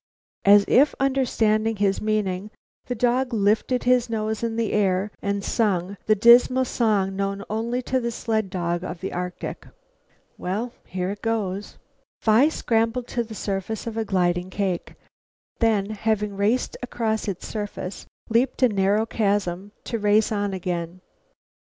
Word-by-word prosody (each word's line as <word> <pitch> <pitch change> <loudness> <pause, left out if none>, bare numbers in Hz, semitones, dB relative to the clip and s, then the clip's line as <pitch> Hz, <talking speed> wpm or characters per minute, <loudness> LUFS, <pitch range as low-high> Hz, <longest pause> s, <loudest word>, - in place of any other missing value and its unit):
As 200 0 +7
if 285 +4 +4
understanding 225 -5 +1
his 200 -1 +1
meaning, 210 -2 -1 0.4
the 245 - -2
dog 245 +1 +1
lifted 220 +4 +1
his 250 -1 +3
nose 220 -1 -2
in 230 -1 -2
air 205 -3 +1
and 200 0 -1
song, 195 -5 0
the 215 - +5
dismal 245 +4 +6
song 205 -6 +1
known 195 0 -2
only 235 +3 -1
to 260 +1 0
the 235 -1 -2
sled 220 -3 -1
dog 175 -1 -2
of 180 -2 -5
the 190 - -5
Arctic. 180 0 -5 0.7
"Well 215 +7 -3
here 185 +2 -3
goes!" 210 -3 -2 0.4
Phi 230 +7 +4
scrambled 230 -3 0
to 240 - -1
the 220 -1 -9
surface 200 +3 -3
of 230 -1 -5
a 225 - 0
gliding 180 -2 0
cake, 190 -3 -2 0.6
then, 215 -3 +2
having 210 -1 -1
raced 210 +6 0
across 225 -3 -2
its 195 -3 -4
surface, 205 -3 -5 0.2
leaped 240 +3 +1
a 250 - +6
narrow 200 +1 +2
chasm, 200 -3 -1
to 230 - -3
race 210 +1 +3
on 205 -1 -1
again. 180 -1 -4
215 Hz, 145 wpm, -24 LUFS, 195-230 Hz, 0.7 s, As